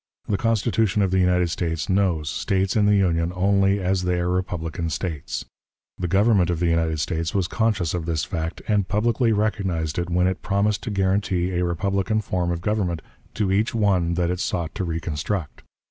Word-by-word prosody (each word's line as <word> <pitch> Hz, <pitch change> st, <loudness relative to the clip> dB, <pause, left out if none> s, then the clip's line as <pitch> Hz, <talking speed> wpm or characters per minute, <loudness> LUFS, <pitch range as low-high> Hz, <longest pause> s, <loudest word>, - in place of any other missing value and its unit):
The 105 Hz, -, +1 dB
Constitution 110 Hz, -1 st, +1 dB
of 95 Hz, -, 0 dB
the 95 Hz, -, +3 dB
United 90 Hz, -1 st, +2 dB
States 80 Hz, -2 st, -2 dB
knows 95 Hz, -6 st, +1 dB
States 95 Hz, +4 st, 0 dB
in 105 Hz, -2 st, +3 dB
the 105 Hz, -, +5 dB
Union 85 Hz, -3 st, +2 dB
only 100 Hz, +1 st, +3 dB
as 95 Hz, 0 st, 0 dB
they 90 Hz, -1 st, 0 dB
are 90 Hz, 0 st, 0 dB
republican 85 Hz, -3 st, -2 dB
States. 75 Hz, -7 st, -4 dB, 0.5 s
The 90 Hz, -, -1 dB
Government 95 Hz, 0 st, +3 dB
of 85 Hz, -2 st, -1 dB
the 90 Hz, -, +1 dB
United 80 Hz, -2 st, +1 dB
States 80 Hz, +2 st, -2 dB
was 95 Hz, -3 st, +1 dB
conscious 100 Hz, -5 st, 0 dB
of 85 Hz, -2 st, -3 dB
this 80 Hz, -3 st, 0 dB
fact, 80 Hz, +1 st, -4 dB
and 105 Hz, -3 st, +1 dB
publicly 115 Hz, +3 st, +1 dB
recognized 95 Hz, -7 st, -1 dB
it 85 Hz, 0 st, -2 dB
when 90 Hz, +1 st, +2 dB
it 95 Hz, 0 st, -1 dB
promised 100 Hz, +1 st, 0 dB
to -, -, -2 dB
guarantee 95 Hz, -2 st, 0 dB
a 90 Hz, 0 st, 0 dB
republican 100 Hz, +5 st, 0 dB
form 90 Hz, -4 st, -1 dB
of 85 Hz, -1 st, -2 dB
government 90 Hz, -5 st, -1 dB, 0.3 s
to 100 Hz, -3 st, 0 dB
each 105 Hz, +5 st, +1 dB
one 95 Hz, -6 st, +2 dB
that 90 Hz, 0 st, +1 dB
it 90 Hz, -, -3 dB
sought 85 Hz, -3 st, -2 dB
to 100 Hz, -, -3 dB
reconstruct. 80 Hz, +1 st, -3 dB
90 Hz, 190 wpm, -23 LUFS, 85-100 Hz, 0.5 s, the